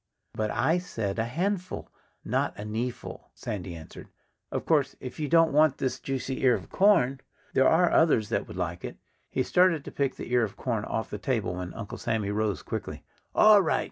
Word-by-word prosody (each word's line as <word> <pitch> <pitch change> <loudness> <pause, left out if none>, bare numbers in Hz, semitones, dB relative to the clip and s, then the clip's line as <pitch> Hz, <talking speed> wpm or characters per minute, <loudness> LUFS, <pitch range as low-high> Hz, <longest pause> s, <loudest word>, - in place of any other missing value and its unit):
"But 110 -1 -1
I 165 +10 +2
said 110 - -4
a 115 - +1
'handful' 180 - -3 0.3
not - - -1
a 105 - -5
'kneeful,'" 115 +3 -5
Sandy 90 -4 -5
answered. 80 -1 -11 0.4
"Of - - -3
course, 145 -4 +2
if 125 +2 -8
you 150 - -1
don't 165 -2 +5
want 150 -2 +4
this 130 -2 -2
juicy 135 -1 -3
ear 125 -3 +5
of - - -8
corn, 140 -10 +3 0.3
there 130 - +4
are 175 +2 +4
others 115 -10 +3
that - - -1
would 85 - -9
like 85 -1 -3
it." - - -6 0.3
He - - 0
started 180 -5 +3
to - - -7
pick 140 -2 -1
the - - -8
ear 125 - +5
of 105 - -4
corn 115 -5 -2
off 110 - -3
the 105 - -4
table 115 -9 -1
when 90 0 -5
Uncle 105 -3 -7
Sammy 105 -3 -1
rose 105 -4 -1
quickly. - - -5 0.3
"All 215 -1 +7
right!" 165 - +1
125 Hz, 200 wpm, -27 LUFS, 105-160 Hz, 0.4 s, All